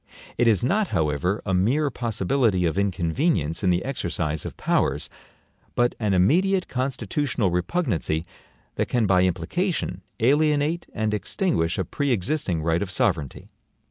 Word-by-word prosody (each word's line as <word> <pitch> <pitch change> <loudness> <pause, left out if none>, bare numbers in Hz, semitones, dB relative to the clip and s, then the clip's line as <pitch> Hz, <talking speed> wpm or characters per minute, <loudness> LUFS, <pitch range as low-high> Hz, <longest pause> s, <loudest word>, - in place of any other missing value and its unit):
It 120 - +2
is 110 -3 +3
not, 200 - +2
however 80 - 0
a 95 - -1
mere 130 +11 +2
possibility 115 -4 0
of 80 - 0
inconvenience 90 - 0
in 95 - +3
the 90 +3 +1
exercise 85 - -2
of - - -9
powers, - - 0 0.6
but 120 0 +2
an 105 -4 +1
immediate 185 - +3
constitutional 125 - -1
repugnancy 90 - -1 0.5
that - - 0
can 120 -3 +2
by 95 -2 +4
implication 170 - -1 0.2
alienate 150 +6 +2
and 110 0 0
extinguish 100 - 0
a 95 - -1
pre 145 - -2
existing 105 - 0
right 80 +1 +1
of 100 - -2
sovereignty. 80 -6 -1
105 Hz, 140 wpm, -24 LUFS, 90-140 Hz, 0.6 s, by